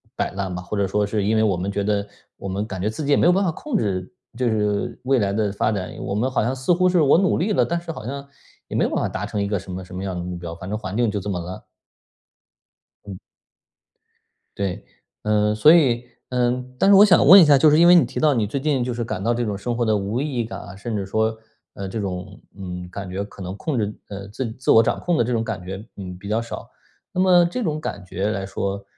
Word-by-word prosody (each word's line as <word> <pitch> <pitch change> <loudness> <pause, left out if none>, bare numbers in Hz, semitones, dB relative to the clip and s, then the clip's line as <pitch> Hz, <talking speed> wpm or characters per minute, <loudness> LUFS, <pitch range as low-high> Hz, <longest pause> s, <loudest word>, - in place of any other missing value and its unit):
摆 - - -1
烂 95 -1 -4
吧。 90 - -4
或 100 +3 -5
者 100 -1 +1
说 105 +2 +1
是 105 0 -1
因 110 +2 +1
为 110 - +3
我 100 -4 +2
们 95 +3 -3
觉 100 0 -2
得 105 0 0 0.3
我 100 - -7
们 100 +3 -2
感 95 -2 -5
觉 105 - 0
自 140 +7 -5
己 145 - 0
也 - - +5
没 - - +3
有 175 - +6
办 195 +2 +2
法 175 - +1
控 250 - -3
制 95 - -2 0.2
就 125 -2 +1
是 105 -2 -1
未 130 -1 +2
来 100 -1 +1
的 105 -1 0
发 110 - 0
展， 95 -3 -4
我 - - -4
们 120 +6 0
好 130 - 0
像 125 +3 0
似 130 +7 +1
乎 180 +1 +3
是 180 -1 +3
我 145 +2 +5
努 190 0 +2
力 205 +5 0
了， - - +3
但 170 0 -1
是 170 0 -13
好 110 - -8
像 140 +2 -6 0.4
也 - - -6
没 - - +2
有 - - +1
办 - - -1
法 - - 0
达 - - -4
成 105 - -3
一 100 - -1
个 105 -1 0
什 95 0 -10
么 90 0 -6
什 90 - -11
么 95 - -4
样 95 -2 -3
的 - - -3
目 90 0 -5
标， 85 -1 -7
反 90 +2 -8
正 105 - -2
环 100 0 -5
境 120 -2 +2
就 105 0 -2
这 105 - -5
么 90 -3 -2
烂。 90 +2 -7 1.4
嗯。 95 -2 -7 1.4
对， 100 0 -3 0.4
呃， 105 0 +2
所 130 +10 +6
以 125 -7 +3 0.2
嗯， 125 0 -1
但 195 - +4
是 - - +8
我 200 - +9
想 190 -8 +5
问 195 +4 +11
一 165 - +7
下， 145 -2 +6
就 155 - +6
是 150 - +4
因 170 - +6
为 175 - +8
你 170 - +6
提 - - -5
到 150 -2 +4
你 110 -4 0
最 130 +7 -3
近， 140 -3 0
就 125 -1 -2
是 120 - -3
感 105 -4 -4
到 115 +3 +1
这 120 0 -1
种 105 -3 -2
生 120 +4 -3
活 120 0 0
的 110 -1 +2
无 105 +6 -2
意 145 -4 -3
义 115 - 0
感 115 - -7
啊， - - -10
甚 110 +2 -4
至 100 -2 -2
说， 110 +2 0 0.4
呃， 100 -1 -6
这 110 - -4
种 90 -3 -5 0.2
嗯， 90 -2 -6
感 95 +1 -7
觉 95 +2 -3
可 100 -1 -13
能 95 +1 -5
控 145 -1 -2
制 105 -1 -1
呃， 100 -1 -7
自 115 +2 -4
自 130 - 0
我 110 - +8
掌 115 - 0
控 175 -2 0
的 120 - +2
这 125 - -1
种 115 -1 0
感 110 -5 -4
觉， 95 +4 -7
嗯， 90 -2 -7
比 100 +2 -9
较 110 +2 +1
少， 115 - -8 0.4
那 - - -4
么 180 -2 +6
这 245 +9 -3
种 155 -6 -2
感 100 -10 -5
觉 95 +3 -2
来 100 -3 -3
说， 100 +1 -3
110 Hz, 300 characters per minute, -22 LUFS, 100-130 Hz, 1.4 s, 问